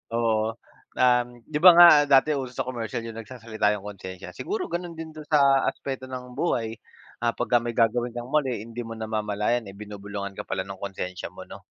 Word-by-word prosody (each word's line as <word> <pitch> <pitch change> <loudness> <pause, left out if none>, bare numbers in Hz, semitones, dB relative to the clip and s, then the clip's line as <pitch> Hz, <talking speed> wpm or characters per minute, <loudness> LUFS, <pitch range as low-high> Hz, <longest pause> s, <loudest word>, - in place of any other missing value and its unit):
Oo, 110 -1 +1 0.4
um, 125 -1 +4 0.2
'di 150 - -2
ba 180 0 +11
nga 175 0 +11 0.2
dati 140 +2 +5
uso 130 -2 -5
sa - - -1
commercial 120 -1 -4
yung 115 -1 -7
nagsasalita 110 -3 -1
yung 100 - -12
konsensya 95 -2 -8
siguro 390 -1 -3
gano'n 175 -1 -4
din 160 -1 -7
do'n 155 -1 -10
sa 140 -3 +4
aspeto 135 -1 -6
ng 125 -1 -7
buhay, 115 -10 0 0.5
ah, 115 - +2
pagka 120 - +2
may 120 0 -3
gagawin 120 +1 +1
kang 120 +1 -6
mali 135 -8 +1
hindi 115 +1 -9
mo 115 - -6
namamalayan, 110 +1 -1
eh, 95 - -10
binubulungan 100 -1 -6
ka - - -4
pala 95 -1 -2
ng 100 -1 -8
konsensya 95 -2 -5
mo - - -9
'no? - - -10
115 Hz, 195 wpm, -25 LUFS, 105-130 Hz, 0.5 s, ba